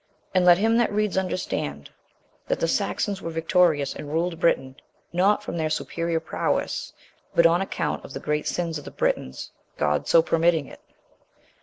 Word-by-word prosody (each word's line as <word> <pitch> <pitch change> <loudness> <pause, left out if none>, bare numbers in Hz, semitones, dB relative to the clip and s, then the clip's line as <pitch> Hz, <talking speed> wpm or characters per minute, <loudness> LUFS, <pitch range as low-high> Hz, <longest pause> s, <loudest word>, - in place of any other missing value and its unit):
And 185 -1 +3
let 175 -1 +8
him 225 +4 +2
that 235 -3 +2
reads 210 -1 0
understand, 185 -1 -3 0.6
that - - 0
the - - +1
Saxons 200 -2 -1
were - - -4
victorious, 165 -2 +2
and 145 -1 -8
ruled 165 +1 -1
Britain, 135 -6 +1 0.4
not 200 +4 +3
from - - -5
their 160 -1 0
superior 165 +1 -1
prowess, 160 - -2 0.4
but 170 - +5
on 170 +2 +5
account 195 - -2
of - - -10
the - - -5
great 150 0 -2
sins 165 -3 -2
of 145 - -13
the - - -6
Britons: 65 - -2 0.3
God 75 0 0
so 165 - +6
permitting 165 -2 +2
it. - - -13
170 Hz, 170 wpm, -25 LUFS, 160-185 Hz, 0.6 s, let